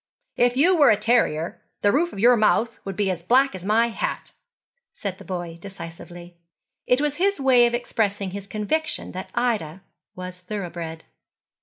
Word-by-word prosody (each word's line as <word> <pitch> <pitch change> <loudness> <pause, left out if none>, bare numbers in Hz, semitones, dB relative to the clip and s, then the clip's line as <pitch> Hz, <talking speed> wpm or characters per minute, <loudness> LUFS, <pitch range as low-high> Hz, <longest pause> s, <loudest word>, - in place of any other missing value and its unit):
'If 245 +1 +2
you 355 +7 +5
were 295 -4 +6
a 210 - +5
terrier, 210 -8 +1 0.2
the 205 - +5
roof 335 +7 +1
of - - -10
your 240 +5 +6
mouth 225 +1 +2
would 195 -1 -5
be 195 0 +1
as 175 -2 -4
black 260 +9 +3
as 185 -2 -7
my 225 +4 +3
hat,' - - -4 0.6
said 190 -2 -5
the - - -10
boy 175 -3 -5
decisively. 175 -2 -10 0.5
It 250 - +3
was 295 0 -1
his 395 +1 +1
way 255 -3 +5
of 240 - -1
expressing 205 -5 -1
his 200 0 -7
conviction 220 +11 -2
that 185 +1 -7
Ida 205 -8 -1 0.3
was 180 0 -7
thoroughbred. 170 -4 -6
210 Hz, 170 wpm, -24 LUFS, 180-245 Hz, 0.6 s, were